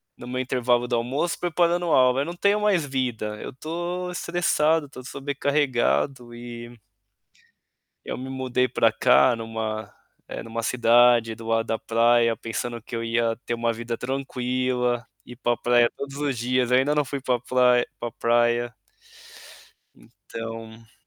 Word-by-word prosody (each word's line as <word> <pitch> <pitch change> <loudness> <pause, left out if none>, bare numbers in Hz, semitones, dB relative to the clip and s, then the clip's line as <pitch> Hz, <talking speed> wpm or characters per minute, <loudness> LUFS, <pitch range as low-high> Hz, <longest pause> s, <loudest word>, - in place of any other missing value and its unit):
no 120 - -11
meu 130 +1 -3
intervalo 125 -1 +1
do 120 - 0
almoço 130 +9 -1
preparando 175 0 +1
aula, 130 0 +4
eu - - -1
não 170 - -5
tenho 200 +3 +2
mais 205 -5 +2
vida, 125 -6 -2
eu - - -6
estou 175 +6 -4
estressado, 165 -3 +1
estou 130 -2 -11
sobrecarregado 140 -2 0
e 120 0 -9 1.3
Eu - - -5
me 130 - -6
mudei 130 -1 0
para 115 -1 +3
cá 125 +2 +4
em - - -8
uma 110 -2 -5 0.3
em - - -6
uma 115 0 -4
cidade 120 -1 +4
do 115 +1 -11
lado 115 0 +1
da 115 - -1
praia 115 0 +3
pensando 115 +2 -4
que 115 +1 -7
eu 115 - -3
ia 115 0 0
ter - - -3
uma 115 0 0
vida 115 +1 -5
tranquila, 125 -2 -1 0.2
ir 120 - -11
para 120 -1 0
praia 120 -1 +3
todos 140 0 -6
os 140 -4 -2
dias, 125 +1 0
ainda 135 +4 +3
não 150 -1 +2
fui 140 0 -5
pra 125 -2 0
prai 125 0 +3 0.2
pra 120 - -3
praia. 120 0 +1 1.5
Então 115 0 -8
125 Hz, 155 wpm, -24 LUFS, 115-135 Hz, 1.5 s, aula